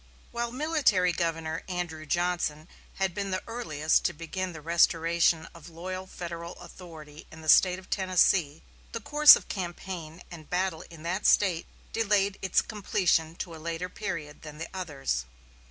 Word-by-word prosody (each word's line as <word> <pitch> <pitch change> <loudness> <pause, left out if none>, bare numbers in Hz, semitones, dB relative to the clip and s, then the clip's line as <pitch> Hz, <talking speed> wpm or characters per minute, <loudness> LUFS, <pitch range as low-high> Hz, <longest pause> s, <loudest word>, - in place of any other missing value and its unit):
While 235 0 -2
Military 255 - +2
Governor 165 -1 -2
Andrew 170 -4 -4
Johnson 175 -2 -1 0.3
had 190 -2 -1
been 200 +1 -3
the 185 0 -2
earliest 160 -10 0
to - - +1
begin 180 +4 -4
the 160 - -9
restoration 165 0 +2
of 170 0 -12
loyal 185 +3 -6
Federal 170 -1 -7
authority 160 -4 -12
in 160 - -11
the 155 - -10
State 180 +2 +6
of 190 - -13
Tennessee, 185 -5 +2 0.3
the 230 - -3
course 295 +6 +8
of - - -7
campaign 175 -3 -6
and 160 -3 -11
battle 180 -2 -1
in 165 -2 -12
that 185 +4 0
State 180 -5 +3 0.3
delayed 200 -3 +1
its 190 -2 +2
completion 175 -6 0
to 170 -1 -6
a 160 - -11
later 170 +2 -4
period 165 -8 -5
than 150 -1 -9
in 155 - -11
the 165 - -5
others. 140 - -3
175 Hz, 160 wpm, -28 LUFS, 160-190 Hz, 0.3 s, course